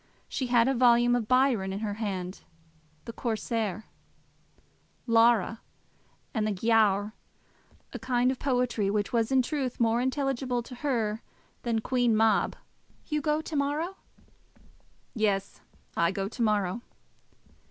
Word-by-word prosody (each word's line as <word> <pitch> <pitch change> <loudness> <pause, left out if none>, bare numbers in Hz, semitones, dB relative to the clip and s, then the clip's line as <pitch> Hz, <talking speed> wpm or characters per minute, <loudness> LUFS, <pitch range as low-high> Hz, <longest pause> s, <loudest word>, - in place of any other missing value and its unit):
She 260 - -3
had 240 -1 +4
a 270 - +2
volume 240 -1 +4
of 235 -3 -1
Byron 255 -6 +2
in 195 +2 -4
her 210 -2 -2
hand, 195 -4 -4 0.6
the 230 - -7
Corsair, 220 -3 -2 1.2
Lara, 230 -2 +3 0.7
and 215 -2 0
the - - 0
Giaour, 210 0 +2 0.8
a - - -5
kind 250 0 +1
of 260 - -5
poetry 245 -6 0
which 205 +2 -1
was 230 +1 +1
in 260 -1 +4
truth 265 -2 -3
more 230 0 +2
intelligible 260 -2 -1
to 250 - -11
her 235 -5 -1 0.4
than 230 -2 -1
Queen 245 -2 +1
Mab. 220 -1 +2 0.5
"You 300 -1 -1
go 300 +2 0
to 315 - -6
morrow?" 300 +7 -1 1.2
"Yes; 200 -4 -1 0.3
I 170 0 +2
go 195 0 -3
to 230 - -7
morrow." 210 -1 +1
235 Hz, 130 wpm, -28 LUFS, 215-255 Hz, 1.2 s, had